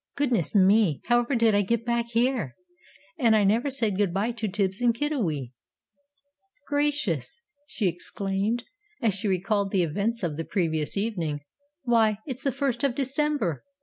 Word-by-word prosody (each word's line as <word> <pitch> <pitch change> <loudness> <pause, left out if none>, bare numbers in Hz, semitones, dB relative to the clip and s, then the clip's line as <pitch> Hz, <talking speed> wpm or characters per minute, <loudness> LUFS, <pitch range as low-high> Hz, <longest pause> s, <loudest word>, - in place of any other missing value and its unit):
"Goodness 245 - 0
me! 195 -5 +4
however 240 +2 +3
did 230 -2 +4
I 205 - +4
get 230 +3 -1
back 235 -1 0
here? 235 - 0 0.6
And 230 -3 +4
I 210 - +4
never 225 +8 +2
said 225 -8 0
good 200 -3 +1
bye 200 +6 0
to 225 -2 -3
Tibbs 195 +1 -1
and 240 -2 +3
Kiddiwee! 200 - -1 1.2
"Gracious!" 290 - -1 0.2
she 215 -9 -1
exclaimed, 195 +6 -2 0.4
as 225 -4 +2
she 200 +2 -2
recalled 195 +2 0
the 190 -2 +2
events 205 +8 -1
of 155 -4 -2
the 165 - -2
previous 160 -2 -1
evening, 175 -9 -2 0.4
"why, 225 -4 +3
it's 260 -3 -5
the 275 - +1
First 270 -1 -2
of 270 -4 +1
December! 275 - -1
220 Hz, 155 wpm, -26 LUFS, 190-240 Hz, 1.2 s, me